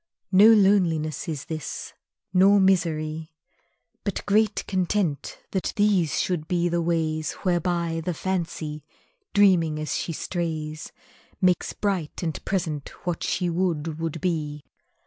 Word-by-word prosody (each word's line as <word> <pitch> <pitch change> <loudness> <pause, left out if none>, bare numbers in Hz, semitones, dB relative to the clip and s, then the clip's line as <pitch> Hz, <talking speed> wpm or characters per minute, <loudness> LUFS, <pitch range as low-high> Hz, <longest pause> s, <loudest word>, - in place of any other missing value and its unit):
No 200 +3 +8
loneliness 185 -8 +3
is 150 -5 -4
this, 155 -2 -5 0.4
nor 195 +2 +6
misery, 160 -4 +1 0.7
But 200 - -3
great 210 0 +2
content 185 -5 -1
that 190 - -1
these 200 -7 +2
should 170 -4 -1
be 175 -1 +1
the 170 0 0
ways 160 -2 0
Whereby 170 -2 0
the 175 0 -2
Fancy, 160 -5 -3 0.5
dreaming 180 -6 +4
as 155 0 -2
she - - -2
strays, 155 -2 -4 0.5
Makes 180 -2 +2
bright 185 -6 -2
and 160 -3 -3
present 160 -7 -2 0.2
what 175 -2 -2
she 180 - 0
would 165 -3 -1
would 165 0 -3
be. 150 -4 -2
170 Hz, 125 wpm, -25 LUFS, 155-190 Hz, 0.7 s, No